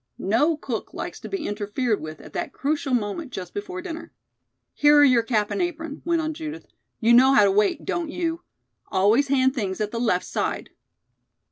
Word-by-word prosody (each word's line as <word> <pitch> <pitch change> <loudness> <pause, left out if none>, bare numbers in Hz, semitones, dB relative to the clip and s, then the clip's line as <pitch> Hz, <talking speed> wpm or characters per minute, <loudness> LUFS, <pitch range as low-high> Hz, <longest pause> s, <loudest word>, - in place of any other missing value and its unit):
No 290 - +2
cook 240 -7 -5
likes - - -5
to - - -8
be 390 -5 -3
interfered 210 +2 -1
with 155 0 -8
at - - -13
that 345 -5 -4
crucial 280 -2 -1
moment 245 +6 -3
just 185 -6 -7
before 370 -3 -5
dinner. 335 -3 -7 0.6
"Here 295 0 +5
are 290 - +8
your 255 -4 +5
cap 220 -3 0
and - - -1
apron," 325 -4 -4
went 335 -1 +1
on 315 0 -2
Judith. 315 +1 -7 0.3
"You 235 +1 +4
know 260 +3 +7
how 210 - +7
to 200 - +4
wait, 205 +1 +1
don't 340 -3 -2
you? 335 0 -2 0.5
Always 215 +9 +3
hand 260 -1 +3
things 200 -8 -3
at 210 -1 -2
the 230 - -3
left 210 -7 +1
side." - - -3
265 Hz, 195 wpm, -24 LUFS, 210-320 Hz, 0.6 s, are